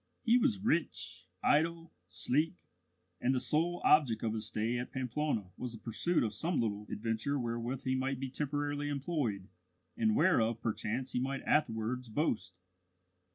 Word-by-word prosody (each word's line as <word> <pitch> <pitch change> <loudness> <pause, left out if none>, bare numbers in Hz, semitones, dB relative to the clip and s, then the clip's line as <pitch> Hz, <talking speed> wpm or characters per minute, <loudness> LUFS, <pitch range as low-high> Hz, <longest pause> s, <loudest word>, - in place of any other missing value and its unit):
He 235 -1 +5
was 230 -7 +2
rich, 95 - -1 0.2
idle, 165 +2 +2
sleek; 130 - +1 0.6
and 130 +2 +2
the - - +2
sole 170 +6 0
object 130 -8 +5
of 110 -1 0
his 110 -1 -1
stay 110 +3 -1
at 125 - -5
Pamplona 125 -6 -1
was 125 -2 -4
the - - -7
pursuit 140 +10 +1
of 110 -2 -1
some 160 - 0
little 105 -2 -1
adventure 115 +6 -1
wherewith 120 +1 -3
he 130 - 0
might 130 0 -1
be 135 -1 -4
temporarily 145 +1 -1
employed, 140 - -2 0.5
and 225 -2 +2
whereof 115 - +3
perchance 115 +3 -2
he - - 0
might 135 +1 -2
afterwards 125 -3 0
boast. 105 - -1
130 Hz, 155 wpm, -33 LUFS, 110-150 Hz, 0.6 s, He